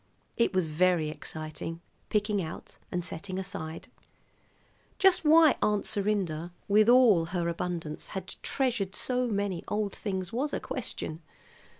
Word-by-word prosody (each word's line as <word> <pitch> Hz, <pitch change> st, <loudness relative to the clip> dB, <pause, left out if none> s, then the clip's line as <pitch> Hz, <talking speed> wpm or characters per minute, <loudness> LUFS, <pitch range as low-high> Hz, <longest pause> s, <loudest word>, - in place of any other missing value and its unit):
It 235 Hz, -, +2 dB
was 185 Hz, -3 st, +1 dB
very 165 Hz, 0 st, +2 dB
exciting, 155 Hz, +1 st, -6 dB, 0.3 s
picking 210 Hz, -1 st, +1 dB
out 160 Hz, -1 st, -8 dB
and 175 Hz, -1 st, -1 dB
setting 185 Hz, +2 st, -4 dB
aside. 190 Hz, -4 st, -5 dB, 1.1 s
Just 380 Hz, -3 st, +4 dB
why 315 Hz, -1 st, +7 dB
Aunt 210 Hz, -1 st, +1 dB
Serinda, 190 Hz, -6 st, -1 dB, 0.2 s
with 210 Hz, +2 st, +5 dB
all 235 Hz, -9 st, +6 dB
her 170 Hz, 0 st, -2 dB
abundance, 170 Hz, -2 st, -3 dB
had 190 Hz, -1 st, -5 dB
treasured 230 Hz, -8 st, -1 dB
so 250 Hz, -1 st, +2 dB
many 200 Hz, -5 st, -1 dB
old 210 Hz, -1 st, -1 dB
things 190 Hz, -3 st, -4 dB
was 280 Hz, +5 st, -1 dB
a -, -, 0 dB
question. 160 Hz, +1 st, -5 dB
190 Hz, 130 wpm, -29 LUFS, 170-215 Hz, 1.1 s, why